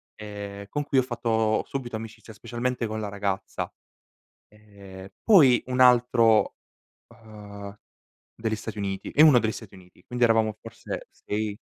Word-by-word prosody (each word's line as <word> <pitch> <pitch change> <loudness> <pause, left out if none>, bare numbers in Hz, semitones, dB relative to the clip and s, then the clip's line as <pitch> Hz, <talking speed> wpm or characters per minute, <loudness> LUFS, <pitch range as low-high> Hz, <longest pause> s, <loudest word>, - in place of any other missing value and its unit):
ehm, 100 -1 -8
con 145 - -2
cui 140 -1 -1
ho - - +6
fatto 115 -3 0
subito 125 -4 -5
amicizia, 110 0 -10
specialmente 120 +2 -3
con 110 0 -4
la 105 -1 -4
ragazza. 100 -1 -3 0.8
Ehm, 100 -3 -13
poi 145 - +6
un 130 0 -2
altro, 120 -3 +4 0.5
uhm, 105 -3 -11 0.6
degli 110 -1 -2
Stati 110 +1 -7
Uniti, 95 -1 -4
e 150 - +5
1 150 -5 +8
degli 110 -2 0
Stati 110 -3 -10
Uniti. 90 -1 -19
Quindi, 125 0 0
eravamo 110 -2 +2
forse 115 -2 -8
6. 105 0 -4
110 Hz, 145 wpm, -26 LUFS, 100-120 Hz, 0.8 s, 1